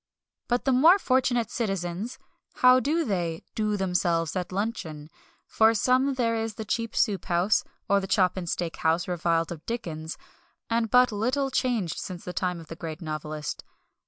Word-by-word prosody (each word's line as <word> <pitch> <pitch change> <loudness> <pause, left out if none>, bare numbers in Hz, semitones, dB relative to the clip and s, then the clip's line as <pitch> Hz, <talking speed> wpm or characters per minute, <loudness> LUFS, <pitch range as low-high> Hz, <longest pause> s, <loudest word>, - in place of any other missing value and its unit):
But 245 +1 0
the 270 - +3
more 315 +9 +7
fortunate 250 - +1
citizens 195 +2 -3 0.4
how 255 0 +6
do 310 +6 0
they 175 -7 -2
"do 210 -1 0
themselves" 175 -3 0
at 180 -1 -3
luncheon? 170 -7 -4 0.3
For 220 +1 +3
some 260 +5 +2
there 235 -3 +1
is 225 -1 -3
the 220 - -6
cheap 230 +1 -2
soup 200 -6 +1
house, 180 +3 +2 0.2
or 200 0 +4
the 195 - -5
chop 185 -3 +2
and 180 -3 -4
steak 170 -1 -2
house 160 +2 +1
reviled 170 -2 0
of 165 -2 -7
Dickens, 165 -9 -4 0.5
and 230 -1 +1
but 250 +1 +5
little 255 +6 0
changed 230 -11 0
since 180 -2 -7
the 180 - -5
time 180 -2 -1
of 165 - -10
the 165 - -8
great 160 -2 -6
novelist. 155 -2 -5
200 Hz, 170 wpm, -27 LUFS, 170-240 Hz, 0.5 s, more